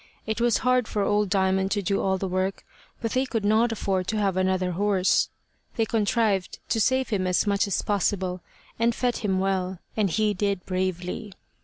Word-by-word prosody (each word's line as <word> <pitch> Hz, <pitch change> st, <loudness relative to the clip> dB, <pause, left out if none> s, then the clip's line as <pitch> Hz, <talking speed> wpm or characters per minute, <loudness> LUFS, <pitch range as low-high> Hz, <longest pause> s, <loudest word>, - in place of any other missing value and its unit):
It 220 Hz, +2 st, -2 dB
was 240 Hz, -2 st, +3 dB
hard 250 Hz, -2 st, +3 dB
for 205 Hz, -, -1 dB
old 205 Hz, 0 st, +1 dB
Diamond 190 Hz, 0 st, +2 dB
to 205 Hz, -1 st, -1 dB
do 195 Hz, +2 st, 0 dB
all 190 Hz, 0 st, +1 dB
the 190 Hz, -, -3 dB
work, 185 Hz, +1 st, -2 dB, 0.4 s
but 230 Hz, -, -1 dB
they 260 Hz, -, +2 dB
could 225 Hz, -5 st, -2 dB
not 220 Hz, +3 st, +3 dB
afford 190 Hz, -4 st, -1 dB
to 220 Hz, -, -1 dB
have 200 Hz, -3 st, +1 dB
another 185 Hz, -1 st, +1 dB
horse. 190 Hz, 0 st, +2 dB, 0.5 s
They 225 Hz, -, +1 dB
contrived 215 Hz, -3 st, 0 dB
to 225 Hz, -, +1 dB
save 260 Hz, +2 st, +2 dB
him 190 Hz, -4 st, 0 dB
as 180 Hz, +3 st, +2 dB
much 200 Hz, +1 st, +1 dB
as 200 Hz, -, -1 dB
possible, 190 Hz, -2 st, 0 dB, 0.4 s
and 230 Hz, 0 st, +2 dB
fed 245 Hz, -1 st, 0 dB
him 200 Hz, -4 st, 0 dB
well, 190 Hz, -1 st, -1 dB, 0.2 s
and 210 Hz, -3 st, +1 dB
he 215 Hz, +4 st, +1 dB
did 200 Hz, -1 st, -1 dB
bravely. 185 Hz, +3 st, -3 dB
200 Hz, 190 wpm, -25 LUFS, 185-220 Hz, 0.5 s, was